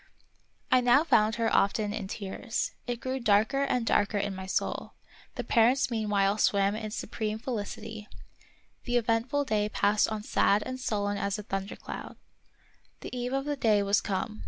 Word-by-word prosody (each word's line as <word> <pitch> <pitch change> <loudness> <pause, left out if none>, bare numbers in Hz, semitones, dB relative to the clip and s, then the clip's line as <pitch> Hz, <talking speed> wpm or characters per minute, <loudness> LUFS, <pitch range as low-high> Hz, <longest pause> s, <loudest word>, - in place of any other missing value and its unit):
I 255 - +6
now 245 +4 +5
found 215 -9 +3
her 230 -1 0
often 205 +1 +2
in 210 -3 -4
tears. 210 +4 -3 0.2
It 240 -1 -2
grew 260 +1 -3
darker 220 +4 +3
and 250 -4 0
darker 205 -1 +2
in 200 0 -1
my 190 0 -7
soul; - - -2 0.4
the - - -3
parents 245 +3 +3
meanwhile 210 -2 +1
swam 200 0 +3
in 215 0 -4
supreme 215 0 -3
felicity; 220 -2 -5 0.8
the 245 0 +1
eventful 240 +5 +1
day 210 -4 0
passed 210 0 +2
on 215 -1 -4
sad 205 0 +2
and 255 0 -5
sullen 205 -4 -1
as 200 0 -1
a 210 - -6
thundercloud. 195 0 -6 0.9
The - - -7
eve 250 +1 -3
of 270 0 -1
the 295 0 -1
day 215 -6 +3
was 200 +1 +2
come. 205 +2 -3
215 Hz, 165 wpm, -29 LUFS, 205-245 Hz, 0.9 s, I